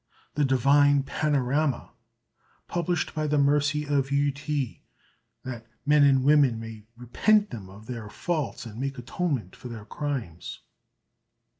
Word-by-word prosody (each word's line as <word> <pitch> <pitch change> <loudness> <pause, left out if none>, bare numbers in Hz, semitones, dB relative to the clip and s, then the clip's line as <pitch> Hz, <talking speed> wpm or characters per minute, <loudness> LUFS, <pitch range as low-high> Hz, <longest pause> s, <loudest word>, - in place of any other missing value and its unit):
_The 145 -2 +2
"Divine 140 +2 +4
Panorama," 140 -1 0 0.8
published 175 -1 -1
by 155 -1 -1
the 150 0 +1
Mercy 145 +1 +2
of 140 -2 0
Yü 140 0 +2
Ti, 145 -2 -3 0.6
that 120 -3 -7 0.2
Men 150 0 +5
and 135 -2 +5
Women 140 -5 +4
may 110 -1 -9
repent 205 - +2
them 100 -6 -7
of 105 +3 -13
their 115 -3 -6
Faults 155 -1 -3
and 115 0 -9
make 135 +1 -3
Atonement 125 - -3
for - - -10
their 115 -3 -8
Crimes. 125 - -5
140 Hz, 135 wpm, -27 LUFS, 120-150 Hz, 0.8 s, Men